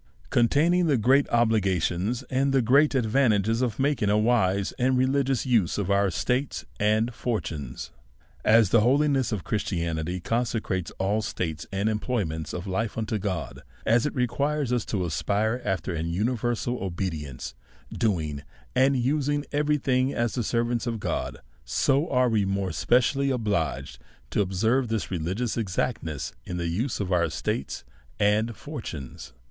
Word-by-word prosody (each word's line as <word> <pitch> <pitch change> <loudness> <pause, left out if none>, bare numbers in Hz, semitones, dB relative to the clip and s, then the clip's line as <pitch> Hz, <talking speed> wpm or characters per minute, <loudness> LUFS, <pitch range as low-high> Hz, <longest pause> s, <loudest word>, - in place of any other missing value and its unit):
Containing 165 +9 +3
the 145 -4 +3
great 130 +5 +4
Obligatiofis, 110 - +1
and 135 +1 +2
the 135 -2 +3
great 140 +5 +4
Ad' 125 -3 +2
vantages 110 -2 +2
of 120 -4 -1
making 135 -6 +1
a 105 - +3
wise 105 -4 +2
and 130 +1 +2
religious 135 0 +1
Use 115 -9 +2
of 100 -1 -1
our 100 0 +3
Estates 125 - -1
and 110 +3 +2
Fortunes. 80 - -4 0.5
AS 110 -3 +5
the 115 - +5
holiness 135 +2 +2
of 105 -6 -2
Christianity 85 -4 -2
consecrates 110 -5 -1
all 100 +3 +1
states 80 -6 -4
and 100 +2 0
employments 105 -8 -2
of 90 - -5
life 105 +4 -2
unto 110 -1 -1
God; 95 -5 -4 0.2
as 120 +5 +3
it - - -5
requires 140 +2 0
us 120 - 0
to 95 -4 -1
aspire 105 +8 0
after 95 -3 -2
an 85 0 -2
universal 120 +4 -1
obedience, 85 -8 -4 0.4
doing 80 -10 -1 0.3
and 135 +1 +4
using 145 +3 0
every 150 0 +2
thing 130 -1 +1
as 120 -1 0
the 125 - -1
servants 120 +2 0
of 115 -2 -2
God, - - -3 0.3
so 135 - +1
are 125 0 +3
we 110 -3 +2
more 95 -1 -1
es' 80 -2 -5
pecially 135 +3 +3
obliged 100 - -2 0.3
to - - +2
observe 110 +7 +1
this 110 -3 -2
religious 95 +8 -2
exactness 90 - -2
in 90 - -5
the 85 -1 -2
use 110 +10 -2
of 100 -2 -2
our 85 -1 +3
estates 80 -4 -3 0.4
and 110 +2 +2
fortunes. 65 -8 -8
110 Hz, 155 wpm, -26 LUFS, 95-125 Hz, 0.5 s, AS